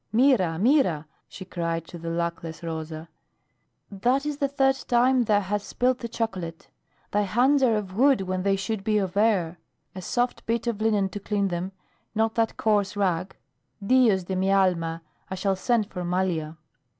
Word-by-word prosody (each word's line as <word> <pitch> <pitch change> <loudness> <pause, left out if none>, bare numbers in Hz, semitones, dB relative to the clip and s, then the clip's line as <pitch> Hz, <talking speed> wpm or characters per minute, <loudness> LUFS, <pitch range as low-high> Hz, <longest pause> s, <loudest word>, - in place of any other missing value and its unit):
"Mira! 220 -9 +3
Mira!" 200 - +2 0.2
she 190 - -10
cried 170 -2 -3
to 175 - -10
the 165 0 -5
luckless 170 -1 -4
Rosa. 160 -1 -5 0.8
"That 250 +8 +1
is 300 -1 -2
the 280 - +1
third 270 -1 +2
time 250 +1 +3
thou 205 -2 +3
hast 205 +1 -3
spilt 255 0 +1
the 235 - -4
chocolate. 190 -8 -4 0.4
Thy 205 - +2
hands 245 +8 +3
are 240 -4 +4
of 195 -3 -4
wood 265 -1 +4
when 185 -1 -2
they 195 +1 +2
should 195 +1 -3
be 215 +1 +1
of 190 -2 -1
air. 190 -6 +1 0.3
A 185 - -7
soft 245 +6 -1
bit 230 +1 0
of 230 -3 -2
linen 210 -3 +2
to 205 - -6
clean 200 -1 -1
them, 175 +2 -3 0.4
not 220 +1 +1
that 225 -1 0
coarse 205 -2 +1
rag. 185 -2 -1 0.5
Dios 225 -5 +4
de 190 +2 -4
mi 190 +1 +1
alma! 170 -4 +1 0.3
I 190 - -3
shall 195 +1 0
send 225 +3 +1
for 180 -3 -6
Malia." 175 -3 -1
195 Hz, 175 wpm, -25 LUFS, 180-230 Hz, 0.8 s, are